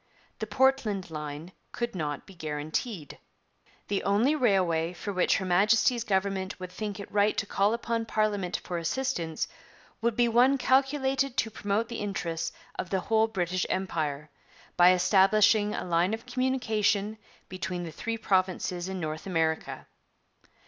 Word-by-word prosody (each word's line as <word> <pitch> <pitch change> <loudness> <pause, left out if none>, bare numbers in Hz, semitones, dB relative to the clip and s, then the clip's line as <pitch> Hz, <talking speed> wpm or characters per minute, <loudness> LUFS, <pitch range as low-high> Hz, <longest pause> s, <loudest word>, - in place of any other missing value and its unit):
The 220 - -3
Portland 220 -6 +1
line 150 +2 -6 0.2
could 235 0 -3
not 150 -5 -3
be 195 - -14
guaranteed. 155 - -4 0.7
'The 200 -1 0
only 215 +9 +2
railway 185 - +2
for 200 +3 -5
which 185 - +3
Her 190 - -3
Majesty's 210 +6 +3
Government 190 -3 -1
would 185 -1 -7
think 205 +1 -5
it 200 - -8
right 205 +1 +2
to - - 0
call 200 +1 +2
upon 230 -1 -2
Parliament 205 -5 0
for 175 -1 -3
assistance 170 -4 -2 0.5
would 235 -1 +1
be 240 +1 +3
one 250 +4 +4
calculated 270 0 +1
to 225 - +1
promote 205 +3 -1
the 235 -1 -5
interests 165 -5 -3 0.3
of 180 - -3
the 190 - +1
whole 220 +2 +2
British 185 -3 -1
Empire, 155 -6 -2 0.4
by 175 +1 +7
establishing 200 +3 +4
a - - -4
line 175 +4 +2
of 225 - -14
communication 220 -5 0 0.3
between 185 -1 -4
the 165 - -6
three 230 +8 -4
provinces 185 -3 0
in 190 -1 -4
North 155 +1 -4
America.' 160 -3 -1
195 Hz, 150 wpm, -28 LUFS, 175-225 Hz, 0.7 s, by